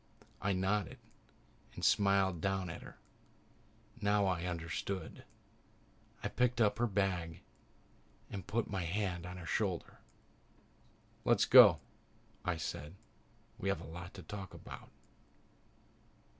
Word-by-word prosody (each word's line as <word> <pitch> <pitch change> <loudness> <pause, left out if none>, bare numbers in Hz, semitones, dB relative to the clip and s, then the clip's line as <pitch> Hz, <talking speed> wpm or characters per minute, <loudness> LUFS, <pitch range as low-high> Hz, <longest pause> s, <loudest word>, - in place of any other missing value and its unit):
I 100 - +1
nodded 95 +2 0 0.8
and - - -2
smiled 100 -4 +3
down 95 -2 -1
at - - -8
her. - - -12 1.0
Now 100 0 +3
I 90 -2 0
understood. 85 +3 -4 1.0
I - - +1
picked 125 0 +1
up 110 0 +3
her 120 - +3
bag 95 -5 -1 0.9
and 95 -3 -6
put 115 +2 0
my 95 -2 -2
hand 90 0 -2
on 90 0 -7
her 90 - -8
shoulder. 95 -2 -2 1.2
"Let's - - +4
go," - - +9 0.6
I 90 -2 0
said. 75 +1 -5 0.6
"We 100 - -1
have 100 - 0
a - - -8
lot 90 +3 -8
to 95 - -9
talk 100 -3 -7
about." - - -10
95 Hz, 120 wpm, -35 LUFS, 90-100 Hz, 1.2 s, go